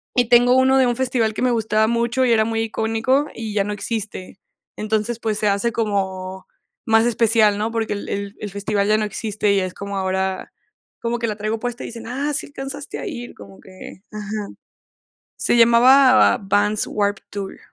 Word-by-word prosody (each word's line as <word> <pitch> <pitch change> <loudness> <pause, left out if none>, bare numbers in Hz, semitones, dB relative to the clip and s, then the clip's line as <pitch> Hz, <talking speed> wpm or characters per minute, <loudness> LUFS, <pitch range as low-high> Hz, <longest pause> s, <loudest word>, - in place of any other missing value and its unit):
Y 245 -3 +2
tengo 245 +1 +5
uno 260 +1 +4
de 260 - +4
un 240 -1 0
festival 245 -3 0
que - - -5
me 255 - +2
gustaba 220 -2 +1
mucho 235 +2 0
y 245 - +2
era 220 -1 +4
muy 225 0 -1
icónico 225 +5 0
y 220 -2 -6
ya 200 - +2
no 210 +1 -3
existe. 205 -2 -5 0.4
Entonces, 215 +2 -1
pues 215 -2 -2
se 210 - +1
hace 200 +4 +1
como 190 -4 -3 0.4
más 225 0 +4
especial, 225 -3 +3
¿no?, 220 +2 -2
porque 225 -2 -2
el 205 - -6
el 200 0 -4
el 210 - -6
festival 200 0 -1
ya 215 0 +3
no 215 - 0
existe 210 0 -1
y 200 - +3
es 185 -1 -3
como 200 0 -6
ahora, 190 0 -2 0.5
como 235 0 -2
que 235 - -2
la 210 - -2
traigo 215 +1 -3
puesta 245 0 -4
y - - -5
dicen: 230 -1 -9
"¡Ah, 275 +5 -2
sí - - -1
alcanzaste 280 0 -7
a - - -5
ir!", 245 -9 -7
como 100 -1 -14
que 185 0 -13
ajá. 210 -1 -5 0.9
Se - - +1
llamaba 255 +3 +6
Vans 205 +1 +1
Warped 205 -1 -1
Tour. 200 -1 -6
220 Hz, 195 wpm, -21 LUFS, 205-240 Hz, 0.9 s, llamaba